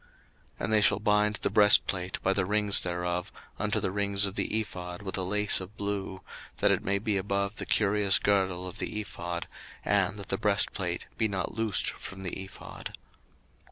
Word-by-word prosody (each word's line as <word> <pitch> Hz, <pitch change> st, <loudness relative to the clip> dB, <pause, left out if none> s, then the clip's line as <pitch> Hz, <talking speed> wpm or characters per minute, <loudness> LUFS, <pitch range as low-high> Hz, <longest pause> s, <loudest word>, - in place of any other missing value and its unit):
02:028:028 -, -, -29 dB, 0.5 s
And 110 Hz, -, 0 dB
they 105 Hz, -, +5 dB
shall 105 Hz, -, +4 dB
bind 105 Hz, 0 st, +2 dB
the -, -, -1 dB
breastplate 100 Hz, -3 st, +4 dB
by 95 Hz, -, +3 dB
the 95 Hz, -, +1 dB
rings 105 Hz, -1 st, +5 dB
thereof 90 Hz, 0 st, -2 dB, 0.3 s
unto -, -, 0 dB
the -, -, -2 dB
rings 100 Hz, 0 st, +1 dB
of 95 Hz, -, -3 dB
the 110 Hz, -, 0 dB
ephod 90 Hz, -3 st, -6 dB
with 95 Hz, -, -3 dB
a 95 Hz, -, -1 dB
lace 105 Hz, +2 st, +3 dB
of 95 Hz, +3 st, -10 dB
blue, 100 Hz, -2 st, -4 dB, 0.3 s
that -, -, +3 dB
it -, -, 0 dB
may 100 Hz, +1 st, +1 dB
be 105 Hz, 0 st, 0 dB
above 100 Hz, +1 st, -1 dB
the -, -, -5 dB
curious 105 Hz, -2 st, +3 dB
girdle 95 Hz, -3 st, 0 dB
of 90 Hz, +2 st, -8 dB
the 105 Hz, -, -3 dB
ephod, 85 Hz, -4 st, -5 dB, 0.4 s
and 100 Hz, 0 st, +1 dB
that 100 Hz, -2 st, -9 dB
the 95 Hz, -, -1 dB
breastplate 95 Hz, -3 st, 0 dB
be 110 Hz, -, +3 dB
not 95 Hz, -3 st, -3 dB
loosed 110 Hz, -3 st, 0 dB
from 95 Hz, 0 st, -10 dB
the 90 Hz, -, -3 dB
ephod. 95 Hz, -, -9 dB
100 Hz, 190 wpm, -28 LUFS, 95-105 Hz, 0.5 s, they